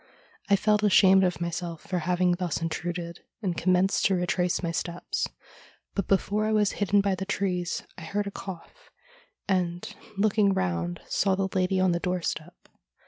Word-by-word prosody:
I 200 - +6
felt 210 +1 +2
ashamed 190 -2 +6
of 180 -2 0
myself 170 -1 -4
for 180 -1 -2
having 180 +2 +1
thus 175 -2 -1
intruded, 170 +1 -4 0.2
and 180 -3 0
commenced 185 +3 +2
to 195 - +4
retrace 180 0 0
my 170 - 0
steps, 170 +1 -2 0.7
but 200 - -2
before 205 +2 +1
I - - 0
was 210 -2 +3
hidden 205 0 +2
by 200 -1 +1
the 190 - -3
trees 185 -3 -1 0.2
I - - -8
heard 205 +4 -1
a 200 - -4
cough, 195 - -9 0.6
and, 175 -2 0 0.3
looking 205 -1 +3
round, 85 - -1
saw 195 -1 +2
the 195 0 -1
lady 185 0 +2
on 185 -1 +3
the 170 - 0
doorstep. 175 -2 -3
185 Hz, 165 wpm, -27 LUFS, 175-195 Hz, 0.7 s, I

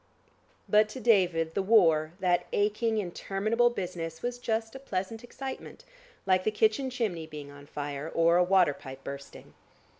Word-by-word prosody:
But 210 0 +4
to 235 - -7
David 180 -9 +2
the - - 0
war, 165 -7 +4
that 175 -1 +2
aching 215 +2 +1
interminable 210 +5 0
business 175 -7 -5
was 245 0 -3
just 225 -2 -2
a 265 - -8
pleasant 225 -2 -4
excitement, 270 - -8 0.4
like 185 -1 +3
the - - +2
kitchen 220 +5 +1
chimney 210 -10 -3
being 150 -2 -9
on 145 0 -13
fire, 145 +1 -5
or 165 +1 +3
a 180 - +5
water 180 -4 +4
pipe 135 0 -11
bursting. 140 0 -9
190 Hz, 155 wpm, -29 LUFS, 165-225 Hz, 0.4 s, a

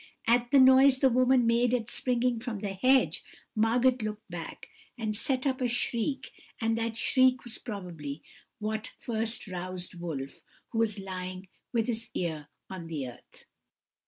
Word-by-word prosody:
At 240 +1 +3
the 280 - +5
noise 260 +1 +7
the 265 -1 +4
woman 255 0 +4
made 235 +1 +3
at 225 -3 -2
springing 245 -1 0
from 235 -2 -4
the 200 -1 -4
hedge, 255 +7 +3 0.3
Margot 240 +4 +3
looked 215 0 -5
back, 170 -2 -7 0.3
and 220 -2 -2
set 255 +4 0
up 265 -1 0
a 250 - +2
shriek, 245 +2 -1 0.3
and 225 -1 +1
that 230 0 -2
shriek 255 +1 +3
was 240 -1 -3
probably 170 - -6 0.3
what 215 0 -4
first 225 0 -2
roused 185 0 -5
Wolf, 140 -6 -5 0.3
who 225 - -1
was 220 -2 +1
lying 185 -1 -6 0.2
with 230 -2 +1
his 230 -1 -3
ear 160 -4 -3 0.2
on 185 -3 -7
the 145 -6 -4
earth. 120 - -17
225 Hz, 160 wpm, -29 LUFS, 185-250 Hz, 0.3 s, noise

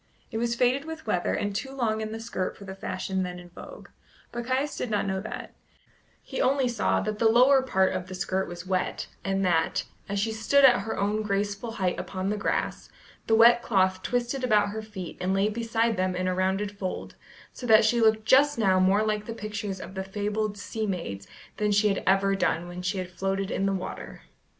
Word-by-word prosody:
It 225 - -2
was 235 0 0
faded 255 +4 +2
with 320 0 -7
weather, 180 -5 0
and 205 -1 -2
too 265 +6 -3
long 225 -5 -1
in 215 0 -4
the 225 - -5
skirt 225 -5 -3
for 200 - -11
the 190 - -6
fashion 190 0 -3
then 180 -1 -4
in 175 0 -12
vogue, 175 - -11 0.4
but 240 0 -5
Caius 265 +3 0
did 250 - -3
not 210 -2 0
know 190 -1 -1
that; 215 - -7 0.7
he - - -4
only 265 0 +2
saw 235 -3 +1
that 215 0 -3
the 225 - +5
lower 255 +4 +6
part 190 -7 +2
of 185 -1 -4
the 185 - -7
skirt 190 +1 -1
was 175 +1 -8
wet, 185 0 -1 0.2
and 195 0 0
that, 165 -3 +1 0.2
as 200 0 -1
she 220 +3 0
stood 230 +6 +4
at 245 -2 +6
her 220 - -4
own 205 +2 0
graceful 205 +2 -2
height 185 -5 -1
upon 190 +1 -3
the - - 0
grass, 205 - -2 0.4
the 225 - +4
wet 235 +1 +7
cloth 190 -4 +2
twisted 245 +4 -1
about 210 -4 +3
her 220 +2 -4
feet 205 -5 -8
and 185 +1 +1
lay 195 +2 +2
beside 230 0 0
them 185 0 0
in 185 0 -1
a 185 - +1
rounded 190 +2 0
fold, 185 -2 -4 0.4
so 245 - -7
that 220 -1 +7
she 235 +2 +3
looked 220 -1 +3
just 285 +4 +5
now 190 -4 +3
more 190 +3 +4
like 210 -1 -1
the 230 - -5
pictures 210 -2 -4
of 185 - -8
the 190 -1 -3
fabled 205 +1 -2
sea 215 +2 -4
maids 100 - -4 0.3
than 210 0 +1
she 205 +1 +4
had 195 - 0
ever 195 +1 +3
done 175 -3 0
when 175 +1 -7
she 185 +2 -2
had 185 -1 -4
floated 195 +1 -2
in 195 - 0
the - - +1
water. 190 -1 -6
205 Hz, 220 wpm, -27 LUFS, 190-225 Hz, 0.7 s, wet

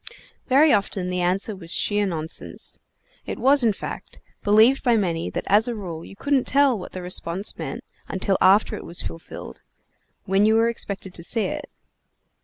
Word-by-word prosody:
Very 285 +4 +5
often 195 -2 -1
the 180 0 -1
answer 190 +4 0
was 170 -2 +1
sheer 205 -1 +2
nonsense. 160 -3 -3 0.5
It - - -4
was, 275 0 +4
in 225 - +4
fact, 200 - -8 0.2
believed 220 +6 +4
by 240 -3 +3
many 170 -6 -1
that - - -4
as 210 +3 +4
a 240 - -2
rule 170 -6 -7
you - - -12
couldn't 275 +3 0
tell 275 -2 +4
what 185 - -8
the 185 - -6
response 180 +2 -2
meant - - -6 0.2
until 195 +1 -1
after 195 +3 +4
it - - -8
was 170 - -3
fulfilled, 85 -2 -9 0.6
when 195 +1 +2
you 220 - +4
were 225 +1 +3
expected 195 -5 -4
to 170 - -1
see 225 +5 -1
it. - - -5
200 Hz, 180 wpm, -23 LUFS, 180-230 Hz, 0.6 s, Very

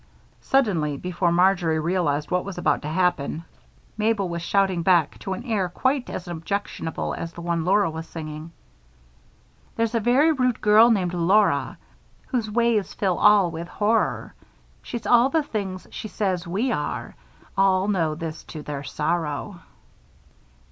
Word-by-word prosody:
Suddenly, 175 - +1
before 175 +1 -1
Marjory 175 -2 +3
realized 155 -3 -1
what 180 0 +1
was 200 -2 -7
about 175 - +1
to - - -6
happen, 165 -1 0 0.5
Mabel 215 -3 +1
was 170 -1 -4
shouting 190 0 +1
back, 170 -3 +2
to 190 - -4
an 215 - -6
air 210 -7 -1
quite 260 +8 -1
as 180 - -6
objectionable 170 0 -4
as 165 0 -6
the 170 - -9
one 170 -1 -1
Laura 200 +1 +3
was 160 0 -6
singing: 155 0 -7 1.2
There's 230 0 0
a 230 - +2
very 255 +8 +4
rude 255 -5 0
girl 215 +2 +6
named 185 -6 +1
Laura, 190 +5 +2 0.5
Whose 235 -5 -1
ways 230 -2 +1
fill 190 -4 0
all 200 -5 +5
with 165 +1 -6
horror. 215 +4 0 0.5
She's 235 -2 -6
all 240 +2 +5
the 315 +2 +1
things 195 -7 -4
she - - -6
says 185 -5 -2
we 210 +9 -1
are; - - -3 0.4
All 190 0 +3
know 165 -7 0
this 160 0 -6
to 155 -2 -8
their 145 -2 -5
sorrow. 160 +4 -2
185 Hz, 150 wpm, -24 LUFS, 165-215 Hz, 1.2 s, girl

